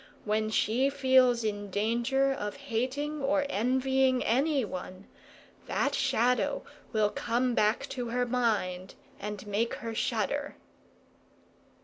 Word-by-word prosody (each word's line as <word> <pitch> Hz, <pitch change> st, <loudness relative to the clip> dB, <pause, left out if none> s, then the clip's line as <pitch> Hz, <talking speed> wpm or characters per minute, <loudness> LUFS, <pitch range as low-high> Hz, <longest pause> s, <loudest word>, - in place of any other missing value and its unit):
When 215 Hz, +1 st, 0 dB
she 235 Hz, +5 st, +2 dB
feels 260 Hz, -3 st, +4 dB
in 205 Hz, -1 st, -3 dB
danger 235 Hz, +7 st, +1 dB
of 210 Hz, -6 st, -4 dB
hating 280 Hz, +4 st, -3 dB
or 285 Hz, +1 st, +1 dB
envying 260 Hz, +1 st, +2 dB
anyone, 230 Hz, -, -1 dB, 0.6 s
that -, -, 0 dB
Shadow 250 Hz, -2 st, +1 dB, 0.3 s
will 215 Hz, -2 st, +2 dB
come 245 Hz, +1 st, 0 dB
back 215 Hz, 0 st, +2 dB
to 245 Hz, -2 st, -4 dB
her 245 Hz, +1 st, 0 dB
mind 210 Hz, -7 st, -1 dB, 0.2 s
and 210 Hz, 0 st, -6 dB
make 210 Hz, +3 st, -1 dB
her 230 Hz, -1 st, -6 dB
shudder." 240 Hz, +5 st, -1 dB
240 Hz, 110 wpm, -29 LUFS, 215-265 Hz, 0.6 s, feels